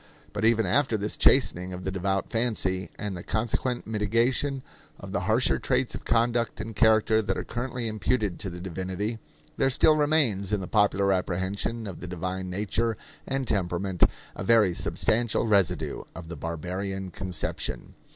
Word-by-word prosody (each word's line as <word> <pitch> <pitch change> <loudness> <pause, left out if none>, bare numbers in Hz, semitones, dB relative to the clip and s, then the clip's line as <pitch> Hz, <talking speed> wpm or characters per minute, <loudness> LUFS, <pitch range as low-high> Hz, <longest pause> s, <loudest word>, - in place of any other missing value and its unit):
But - - -1
even 115 -1 +4
after 115 +4 +2
this 105 +1 -2
chastening 90 -9 +3
of 90 0 -6
the 95 - -2
devout 95 +1 -1
fancy, 95 -6 0
and 105 -2 -4
the 90 - -6
consequent 120 +5 -1
mitigation 115 +6 0 0.4
of 100 - -9
the 100 - 0
harsher 115 +4 +3
traits 130 -1 0
of - - -7
conduct 115 0 +1
and 110 -1 -6
character 110 -1 +4
that 105 - -2
are - - -2
currently 120 0 -4
imputed 110 -2 -1
to 95 - -4
the 90 0 -8
divinity, 95 +5 -4 0.4
there 135 - +3
still 155 +4 +5
remains 145 -11 +2
in 105 - +1
the 95 - -4
popular 100 -1 +3
apprehension 95 +5 -2
of 95 -4 -7
the 90 - -7
divine 90 +1 -4
nature 105 +4 -1 0.3
and 135 -1 -2
temperament 95 -2 -1 0.3
a - - -5
very 105 -3 +4
substantial 110 +9 +1
residue 100 -6 +1
of 85 -1 -9
the 85 - -5
barbarian 90 +5 -4
conception. 95 -1 -4
105 Hz, 160 wpm, -27 LUFS, 95-115 Hz, 0.4 s, still